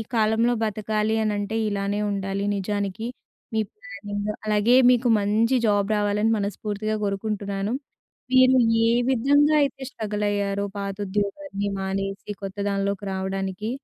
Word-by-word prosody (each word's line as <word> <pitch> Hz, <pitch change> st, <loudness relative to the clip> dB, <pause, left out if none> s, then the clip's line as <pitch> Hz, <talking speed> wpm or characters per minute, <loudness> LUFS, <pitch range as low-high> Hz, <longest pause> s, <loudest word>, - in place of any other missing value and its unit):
కాలంలో 225 Hz, +2 st, +3 dB
బతకాలి 215 Hz, 0 st, 0 dB
అనంటే 205 Hz, 0 st, -1 dB
ఇలానే 200 Hz, 0 st, -1 dB
ఉండాలి 195 Hz, 0 st, -2 dB
నిజానికి. 200 Hz, +1 st, -2 dB, 0.5 s
మీ 220 Hz, -, +1 dB
ప్లానింగ్, 205 Hz, 0 st, -6 dB, 0.2 s
అలాగే 215 Hz, +3 st, +3 dB, 0.2 s
మీకు 245 Hz, 0 st, +2 dB
మంచి 215 Hz, +5 st, +2 dB
జాబ్ 205 Hz, 0 st, +2 dB
రావాలని 210 Hz, +2 st, +1 dB
మనస్ఫూర్తిగా 210 Hz, +1 st, -2 dB
కోరుకుంటున్నాను. 200 Hz, +1 st, -2 dB, 0.6 s
మీరు 260 Hz, 0 st, +6 dB, 0.3 s
ఏ -, -, +4 dB, 0.2 s
విధంగా 285 Hz, +4 st, +4 dB
అయితే 270 Hz, -1 st, -3 dB
స్ట్రగులయ్యారో, 205 Hz, -3 st, -1 dB
పాత 200 Hz, -1 st, -3 dB
ఉద్యోగాన్ని 200 Hz, +2 st, -2 dB
మానేసి 195 Hz, +1 st, -3 dB
కొత్త 195 Hz, +1 st, -6 dB
దానిలోకి 200 Hz, 0 st, -1 dB
రావడానికి. 190 Hz, +2 st, -3 dB
205 Hz, 115 wpm, -24 LUFS, 200-220 Hz, 0.6 s, మీరు